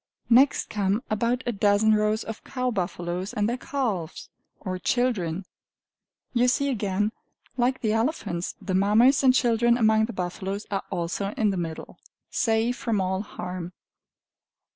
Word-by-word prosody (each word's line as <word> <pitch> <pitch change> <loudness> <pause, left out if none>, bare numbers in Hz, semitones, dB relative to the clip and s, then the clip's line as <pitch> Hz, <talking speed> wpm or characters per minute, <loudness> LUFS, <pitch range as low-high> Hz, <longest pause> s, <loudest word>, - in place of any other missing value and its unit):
Next 265 +4 +5
come 205 +2 0
about 235 +4 0
a 240 - 0
dozen 205 +1 +3
rows 215 +1 +1
of 225 -1 -7
cow 255 -1 -2
buffaloes 180 -2 -3
and 210 0 +1
their 240 - 0
calves, 215 - -3 0.3
or 185 -1 -4
children. 195 -7 0 0.9
You 245 0 +3
see 280 +3 +2
again, 210 -3 0 0.4
like 250 +1 +1
the 215 -2 +1
elephants, 225 - -1
the 195 -1 -4
Mammas 220 +8 +4
and 260 - +7
children 235 -1 +3
among 220 -2 +4
the 235 - -7
buffaloes 190 +2 -4
are 195 -1 0
also 185 +3 -3
in 215 -2 +2
the - - -2
middle, 165 -2 -6 0.3
safe 230 +1 +1
from 225 -4 -1
all 190 0 0
harm. 180 -3 -6
215 Hz, 145 wpm, -26 LUFS, 190-240 Hz, 0.9 s, and